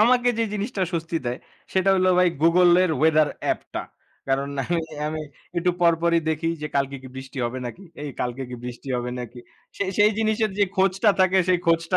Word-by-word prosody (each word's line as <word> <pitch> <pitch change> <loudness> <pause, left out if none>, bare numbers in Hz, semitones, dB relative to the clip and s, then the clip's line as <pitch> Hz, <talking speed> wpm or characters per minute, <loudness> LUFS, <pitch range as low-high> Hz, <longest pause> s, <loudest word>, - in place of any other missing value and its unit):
আমাকে 245 +2 +4
যে 230 - +2
জিনিসটা 205 -1 -2
স্বস্তি 165 0 -2
দেয়, 120 +2 -2 0.3
সেটা 190 +1 +3
হলো 185 0 +3
ভাই 180 -1 +5
Google 175 +2 +5
এর 180 - 0
Weather 155 -1 +4 0.2
অ্যাপ - - 0
টা। - - -2 0.5
কারণ 135 +1 +1 0.2
আমি 170 -1 0 0.3
আমি 155 0 -4 0.4
একটু 175 +1 +2
পরপরই 170 0 +3
দেখি 160 +1 0
যে, - - -1
কালকে 140 0 0
কি 130 - -9
বৃষ্টি 130 +1 -8
হবে 120 +2 -3
নাকি? 145 +11 -8 0.2
এই 145 - -4
কালকে 125 +2 -2
কি 125 - -5
বৃষ্টি 125 +2 -7
হবে 125 0 -3
নাকি? 125 0 -7 0.4
সেই 195 -1 -1
সেই 210 +1 +6
জিনিসের 220 0 +1
যে 205 - +5
খোঁজটা 195 +2 +3
থাকে, 185 0 +4
সেই 180 -1 +4
খোঁজটা 165 +2 +2
170 Hz, 195 wpm, -24 LUFS, 140-190 Hz, 0.5 s, সেই